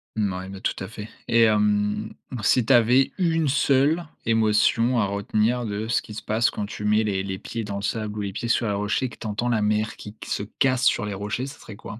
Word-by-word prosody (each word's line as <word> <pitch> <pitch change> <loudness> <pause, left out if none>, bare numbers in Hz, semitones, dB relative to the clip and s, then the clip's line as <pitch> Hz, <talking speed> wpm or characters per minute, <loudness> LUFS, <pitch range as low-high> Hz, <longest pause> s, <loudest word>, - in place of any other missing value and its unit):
Mouais, 95 -3 -2
mais 95 0 -8
tout - - -1
à 95 - -5
fait, 105 0 -8 0.2
et 115 0 +4
hem, 105 0 +1 0.3
si 125 0 +3
tu 135 - +4
avais 125 +3 +4
1 165 -3 +2
seule 140 +4 +2 0.2
émotion 115 +2 +3
à 105 - +2
retenir 105 +4 0
de 105 +1 -3
ce 120 - +1
qui 105 - -11
se 110 - -7
passe 110 +3 +2
quand 105 - -4
tu 105 - -7
mets 105 +1 +3
les 100 -3 -1
les 95 -1 -4
pieds 115 +3 -5
dans 100 -1 -5
le 100 - -4
sable, 105 0 -3
ou - - -2
les 100 -1 -4
pieds 120 - -4
sur 115 - +2
les 100 - 0
rochers, 105 +5 0
et 125 - -3
que - - -13
tu 110 - -5
entends 110 +4 -2
la 115 -3 +1
mer 105 +1 0
qui 105 +1 -10
q - - -10
se 100 - -1
casse 130 +4 0
sur - - +3
les 105 - -4
rochers, 105 +6 -3
ça 140 +1 -10
serait 110 - -10
quoi? 110 +2 -9
110 Hz, 255 wpm, -24 LUFS, 105-120 Hz, 0.3 s, et